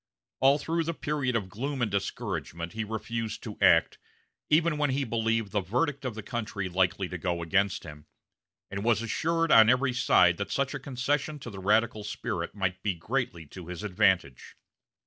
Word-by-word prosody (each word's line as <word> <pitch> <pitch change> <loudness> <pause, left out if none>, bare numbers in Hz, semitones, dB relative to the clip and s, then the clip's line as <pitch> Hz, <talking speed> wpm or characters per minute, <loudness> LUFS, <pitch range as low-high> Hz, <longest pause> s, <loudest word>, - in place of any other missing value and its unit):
All 135 +2 +5
through 165 +2 -1
the 165 0 -2
period 145 -5 -1
of 105 -5 -1
gloom 130 +8 -4
and 120 -4 0
discouragement 85 -3 -3
he 110 - -2
refused 110 +1 -4
to 105 -3 -6
act, - - +4 0.5
even 155 0 +3
when 145 -1 +2
he 135 +2 0
believed 115 -3 0
the 105 -1 +1
verdict 135 - -1
of 125 -4 -3
the 110 - -6
country 110 -5 -4
likely 95 +1 +1
to 90 0 -6
go 85 0 -2
against 100 +3 +1
him, 75 -2 -11 0.6
and 100 0 -4
was 115 -1 +2
assured 165 +8 0
on 110 -1 +8
every 130 +1 +3
side 90 -8 +4
that 100 - -4
such 140 0 -1
a 140 - -4
concession 140 +3 -2
to 125 -4 -8
the 95 - -8
radical 110 +2 +2
spirit 105 - -4
might 95 -2 -2
be 100 -4 -1
greatly 95 -3 -3
to 85 +3 -11
his 90 +2 -6
advantage. 95 -9 +1
110 Hz, 185 wpm, -28 LUFS, 95-135 Hz, 0.6 s, on